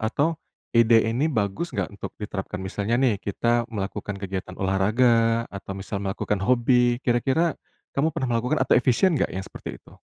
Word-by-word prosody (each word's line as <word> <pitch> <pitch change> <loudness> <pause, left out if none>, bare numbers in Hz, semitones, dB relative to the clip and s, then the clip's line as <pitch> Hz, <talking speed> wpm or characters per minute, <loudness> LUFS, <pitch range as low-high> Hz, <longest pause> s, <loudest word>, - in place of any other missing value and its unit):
atau 145 +8 0 0.3
ide 115 -1 +5
ini 120 +7 +1
bagus 110 - -2
nggak, - - -1
untuk 100 - -8
diterapkan? 100 -2 -5
Misalnya 100 +4 -2
nih, 120 -6 +2
kita 120 +3 0
melakukan 100 -1 -4
kegiatan 95 -1 -4
olahraga 115 +4 +2
atau 100 0 -6
misal 100 +1 -4
melakukan 100 +1 -2
hobi, 120 +2 +3
kira-kira 135 +7 +2 0.4
kamu 155 +3 0
pernah 130 - -1
melakukan 125 +7 0
atau - - +4
efisien 130 +9 +3
nggak - - +1
yang 95 - -3
seperti - - -8
itu? - - -19
115 Hz, 160 wpm, -25 LUFS, 100-125 Hz, 0.4 s, ide